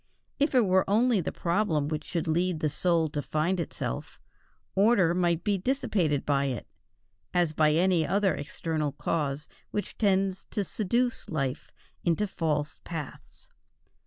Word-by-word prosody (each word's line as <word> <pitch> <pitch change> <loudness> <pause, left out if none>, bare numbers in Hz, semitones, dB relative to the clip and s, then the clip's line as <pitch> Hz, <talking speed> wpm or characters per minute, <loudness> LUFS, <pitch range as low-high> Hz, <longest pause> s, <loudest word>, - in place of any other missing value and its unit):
If 285 -1 +2
it 245 -3 +5
were 185 0 +4
only 225 0 +3
the - - -3
problem 170 -5 0
which 150 0 -3
should 170 -3 -2
lead 175 +1 +1
the 155 -2 0
soul 170 -1 +2
to 145 0 -3
find 160 +6 0
itself, 140 - -4 0.5
order 195 -4 +4
might 175 -2 +1
be 205 -2 +1
dissipated 180 - 0
by 140 -1 +2
it, 130 -3 -3 0.7
as 175 -3 +2
by 155 -1 +3
any 170 -1 +3
other 195 -1 +2
external 155 -1 -3
cause 145 -1 -2 0.2
which 205 - -4
tends 195 -2 +1
to 205 - -2
seduce 235 +6 -1
life 140 -3 -2 0.3
into 175 +5 +2
false 150 -6 -2
paths. 160 -5 -8
170 Hz, 145 wpm, -28 LUFS, 155-195 Hz, 0.7 s, it